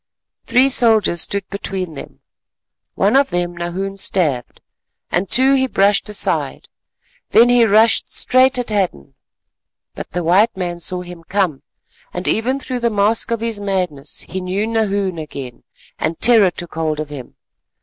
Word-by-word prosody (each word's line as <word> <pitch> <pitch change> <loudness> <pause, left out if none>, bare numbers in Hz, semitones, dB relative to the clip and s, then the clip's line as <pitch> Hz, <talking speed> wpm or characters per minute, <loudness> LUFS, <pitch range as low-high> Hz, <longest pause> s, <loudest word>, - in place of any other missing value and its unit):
Three 255 +2 +4
soldiers 220 -9 +3
stood 200 -2 -1
between 190 -3 -5
them, 140 - -11 0.7
one 205 +5 +2
of 275 0 +3
them 175 0 -2
Nahoon 185 +3 -4
stabbed, 155 -11 -2 0.5
and 180 +1 0
two 265 +2 +4
he 265 -1 +2
brushed 200 -2 +2
aside; 210 - -1 0.6
then 240 +1 +5
he 245 -1 +5
rushed 220 +2 +3
straight 255 +1 +3
at 245 -3 -3
Hadden. 185 - -2 0.8
But - - -8
the 175 0 -4
white 190 +6 +3
man 175 -2 -4
saw 180 +1 -3
him 175 -1 -11
come, 180 -6 -1 0.5
and 180 +1 -4
even 255 +5 0
through 255 -2 -4
the 235 -1 +1
mask 210 +2 +1
of 230 -1 -2
his 230 -2 -2
madness 180 -8 -3
he 190 - -6
knew 185 +3 -2
Nahoon 200 -5 -1
again, 135 -5 -8 0.4
and 160 +1 -2
terror 225 -5 +5
took 175 -1 -9
hold 155 -1 -2
of 155 -1 -5
him. 135 -4 -10
195 Hz, 155 wpm, -18 LUFS, 175-225 Hz, 0.8 s, then